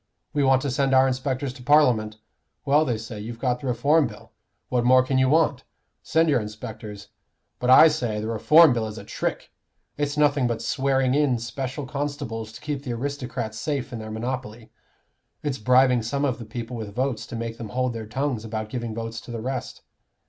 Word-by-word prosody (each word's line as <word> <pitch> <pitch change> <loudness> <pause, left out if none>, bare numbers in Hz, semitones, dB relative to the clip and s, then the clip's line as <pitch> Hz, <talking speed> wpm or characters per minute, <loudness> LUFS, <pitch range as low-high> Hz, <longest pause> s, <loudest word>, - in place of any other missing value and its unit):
We 145 - +1
want 135 -1 +4
to 140 - -1
send 135 0 +2
our 130 0 +6
inspectors 130 0 -2
to 130 - -13
Parliament. 125 -7 +3 0.5
Well, 150 +2 +4
they 120 -5 -1
say 110 -1 -8
you've 115 +2 -7
got 125 0 -1
the 135 - -6
Reform 140 +5 +3
Bill; 105 -2 -13 0.4
what 125 -1 +1
more 130 +1 +6
can 130 0 0
you 130 0 +3
want? 150 -4 +2 0.4
Send 165 +1 +2
your 140 -6 +3
inspectors. 105 -1 -8 0.5
But 125 - -1
I 130 +5 +9
say, 120 -9 -1
the 110 - -4
Reform 125 +7 +6
Bill 115 -2 -1
is 105 0 -8
a - - -8
trick - - -4 0.5
it's 145 0 -2
nothing 145 -3 +3
but 115 -1 -2
swearing 135 0 +1
in 140 -4 +2
special 130 +4 -5
constables 140 -6 -4
to - - -11
keep 145 -2 -3
the 130 -4 -4
aristocrats 125 -4 -4
safe 140 -5 -3
in 115 - -4
their 110 0 -7
monopoly; 115 0 -5 0.7
it's 145 -4 -2
bribing 125 +2 +4
some 140 +6 -1
of 125 -3 -1
the 115 - -7
people 115 +2 -6
with 105 -3 -7
votes 130 -3 -1
to 120 - -7
make 115 0 -5
them 110 -2 -6
hold 125 +1 -1
their 110 -2 -6
tongues 130 0 -2
about 110 -1 -4
giving 120 -2 -4
votes 115 0 -5
to - - -14
the 120 - -4
rest. 130 +3 -5
125 Hz, 200 wpm, -24 LUFS, 115-140 Hz, 0.7 s, I